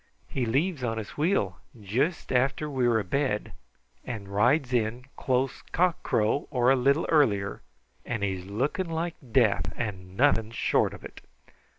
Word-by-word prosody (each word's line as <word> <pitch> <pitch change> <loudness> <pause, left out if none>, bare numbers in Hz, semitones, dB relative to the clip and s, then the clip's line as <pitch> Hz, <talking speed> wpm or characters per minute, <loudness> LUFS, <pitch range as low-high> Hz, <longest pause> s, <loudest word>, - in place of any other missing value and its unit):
He 125 -3 -2
leaves 145 +4 0
on 115 -2 -1
his 110 -2 -5
wheel 145 - 0 0.2
juist 120 - -1
after 130 +4 +1
we're 125 -5 +2
abed 105 +2 -1 0.5
and 110 -5 -6
rides 125 +7 +2
in 120 +1 0
close 130 0 0
cock 180 0 +2
crow 110 +6 +1
or 125 0 +3
a - - +5
little 140 +5 +2
earlier, 105 -11 +2 0.4
and 115 -4 -3
he's 95 -2 -2
looking 140 - -1
like 165 +1 -2 0.2
death 100 -10 +3
and 95 -5 -5
nothing 120 -5 +3
short 115 - +1
of - - -12
it." - - -11
125 Hz, 150 wpm, -27 LUFS, 105-140 Hz, 0.5 s, a